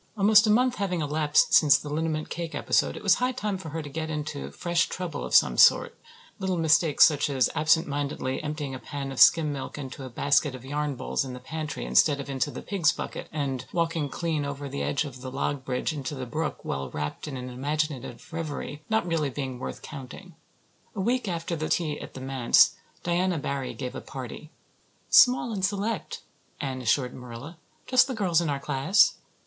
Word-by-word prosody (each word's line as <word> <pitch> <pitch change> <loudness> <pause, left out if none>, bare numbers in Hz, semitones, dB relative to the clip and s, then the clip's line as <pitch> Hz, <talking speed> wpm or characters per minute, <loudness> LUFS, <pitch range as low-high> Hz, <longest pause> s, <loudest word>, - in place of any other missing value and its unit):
Almost 210 +2 +6
a - - +2
month 250 +3 +3
having 185 -4 -1
elapsed 150 0 +2
since 145 -3 +7
the - - -9
liniment 155 +1 -2
cake 170 0 -4
episode, - - +1
it - - -9
was - - +4
high 250 +1 +1
time 210 -6 -3
for 160 - -7
her 160 +1 -4
to - - -8
get 160 +2 -4
into 150 -2 -4
fresh 170 -1 0
trouble 180 -5 -4
of - - -1
some - - +5
sort, - - +6 0.4
little 190 -2 -1
mistakes, 160 -1 +5
such 150 -2 +1
as 130 -4 +2
absentmindedly 145 -4 0
emptying 150 -2 -4
a 130 - -6
pan 140 0 -6
of 135 - -6
skim 155 -3 +6
milk 135 +1 -6
into 135 -1 -7
a 130 - -7
basket 140 +2 +1
of 130 0 -11
yarn 145 +1 -2
balls - - -2
in 130 -2 -6
the 125 - -7
pantry 155 +3 -5
instead 145 -2 +4
of 140 0 -5
into 135 +1 -1
the - - -8
pigs' 175 -6 +2
bucket, - - -6
and 135 -4 -3
walking 165 -3 -1
clean 160 -1 -2
over 140 0 -5
the 140 +1 -4
edge 145 - 0
of 130 -3 -9
the 130 - -6
log 135 +1 -2
bridge 130 +5 -2
into 145 -1 -4
the 130 -2 -5
brook 155 +5 -4
while 70 0 -3
wrapped 75 - -5
in 140 -3 -5
imaginative 135 0 -3
reverie, 150 -2 -5
not 220 -4 +1
really 165 -4 0
being 130 -2 -5
worth - - -6
counting. 150 +6 -9 0.6
A - - -5
week 240 +4 0
after 170 -1 -2
the 155 -1 -3
tea 155 -4 0
at - - -10
the 130 - -7
manse 130 -2 +4 0.3
Diana 175 0 +1
Barry 140 -3 -3
gave 125 -2 -5
a 130 - -6
party. 135 +3 -8 0.6
"Small 245 -1 +6
and 195 -3 -4
select," 200 0 -2 0.4
Anne 130 -2 -3
assured 125 +1 +1
Marilla. 125 +6 -9 0.3
"Just 255 0 +4
the 260 - -3
girls 180 -6 +2
in 165 - -1
our 140 -1 -1
class." 195 +10 +3
150 Hz, 200 wpm, -27 LUFS, 135-170 Hz, 0.6 s, since